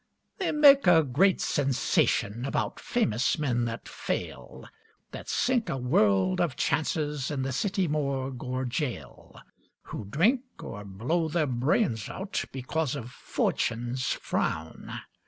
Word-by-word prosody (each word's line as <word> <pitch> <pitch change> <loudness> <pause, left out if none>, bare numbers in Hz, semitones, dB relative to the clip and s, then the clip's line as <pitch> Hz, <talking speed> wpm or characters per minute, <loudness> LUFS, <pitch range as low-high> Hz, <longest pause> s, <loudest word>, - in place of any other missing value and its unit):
They 380 - 0
make 285 -5 +7
a 165 -2 +7
great 155 +9 +3
sensation 125 -5 +1
About 140 - -2
famous 120 - +1
men 125 -6 0
that 115 +1 -5
fail, - - -5 0.4
That - - -8
sink 245 -3 +1
a 135 - -1
world 100 -7 +2
of 160 -7 0
chances 150 0 -1
In 140 -3 -2
the 135 - -2
city 190 - 0
morgue 135 -4 -2
or 130 0 -2
gaol, 120 - -5 0.4
Who 105 - -7
drink, 185 - +2 0.2
or 105 -2 -7
blow 120 - -1
their 160 0 +1
brains 125 - 0
out, 195 +1 -3
Because 135 +2 -2
of 125 -3 -6
"Fortune's 120 +1 -1
frown". 80 0 -3
135 Hz, 130 wpm, -28 LUFS, 120-160 Hz, 0.4 s, make